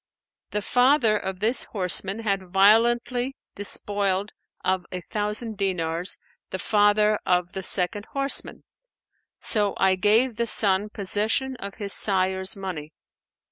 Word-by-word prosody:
The 210 0 -3
father 250 -1 +3
of 190 -2 -4
this 230 +4 +1
horseman 195 +2 -1
had 195 -4 -2
violently 240 +6 +3 0.2
despoiled 200 0 +1 0.3
of 185 0 0
a 180 - -5
thousand 210 +3 -4
dinars 175 -2 -2 0.3
the - - -4
father 210 +1 +2
of 180 -1 0
the 190 - -4
second 195 +3 -1
horseman; 275 0 0 0.8
so 205 -2 0
I 190 -1 +3
gave 215 +6 +2
the 235 0 -1
son 205 -1 +2
possession 215 +6 -1
of 200 -3 -8
his 200 -2 -2
sire's 190 0 +1
money. 175 -6 -6
205 Hz, 125 wpm, -24 LUFS, 190-220 Hz, 0.8 s, father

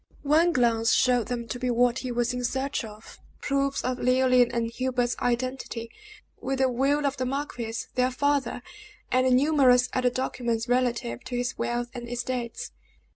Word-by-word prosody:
One 315 +4 +4
glance 235 -4 +2
showed 245 -3 +3
them 240 -2 -4
to 245 - -4
be 250 0 -1
what 245 +1 +2
he 255 - -4
was 240 0 0
in 250 0 -3
search 265 +2 -1
of 215 0 -12 0.2
proofs 275 0 -1
of 255 0 -2
Leoline 255 -1 +4
and 230 -1 -1
Hubert's 245 -1 -1
identity, 245 -1 -2 0.5
with 270 +1 -2
the 260 -1 +2
will 280 +4 +1
of 280 0 -1
the 255 - -1
marquis, 250 -4 -4 0.2
their 255 0 +2
father, 280 -1 0 0.5
and 255 0 +3
numerous 260 -3 +4
other 250 -1 +2
documents 240 -2 -2
relative 245 -1 0
to 250 -1 -4
his 245 0 -2
wealth 240 0 -2
and 240 -2 -7
estates. 245 -1 -4
250 Hz, 165 wpm, -26 LUFS, 240-260 Hz, 0.5 s, One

